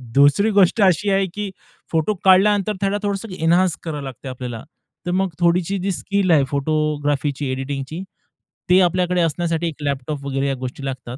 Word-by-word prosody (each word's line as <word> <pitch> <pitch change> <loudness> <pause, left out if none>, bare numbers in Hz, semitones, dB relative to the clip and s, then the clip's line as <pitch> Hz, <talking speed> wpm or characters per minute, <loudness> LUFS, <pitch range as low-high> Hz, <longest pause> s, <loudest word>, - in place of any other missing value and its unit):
दुसरी 145 +10 +5
गोष्ट 200 +2 +4
अशी 195 +1 +3
आहे 195 0 +2
की 205 -1 -4 0.4
फोटो 165 +5 +1
काढल्यानंतर 200 +2 +4
त्याला 200 +1 +1
थोडंसं 200 +1 -3
एन्हान्स 170 +2 +3
करावं 150 -4 -4
लागते 135 0 -8
आपल्याला. 125 -3 -6 0.4
तर 175 - -1
मग 190 +1 +1
थोडीशी 175 +2 +2
जी 195 +2 -1
स्किल 200 0 0
आहे 150 -4 +5
फोटोग्राफीची, 145 -1 -1
एडिटिंगची, 135 +4 -4 0.7
ते 180 +1 +6
आपल्याकडे 180 0 +2
असण्यासाठी 170 0 0
एक 155 -2 -7
लॅपटॉप 140 0 -3
वगैरे 135 0 -1
या 135 - 0
गोष्टी 130 +2 -6
लागतात. 130 -2 -6
165 Hz, 160 wpm, -21 LUFS, 140-190 Hz, 0.7 s, ते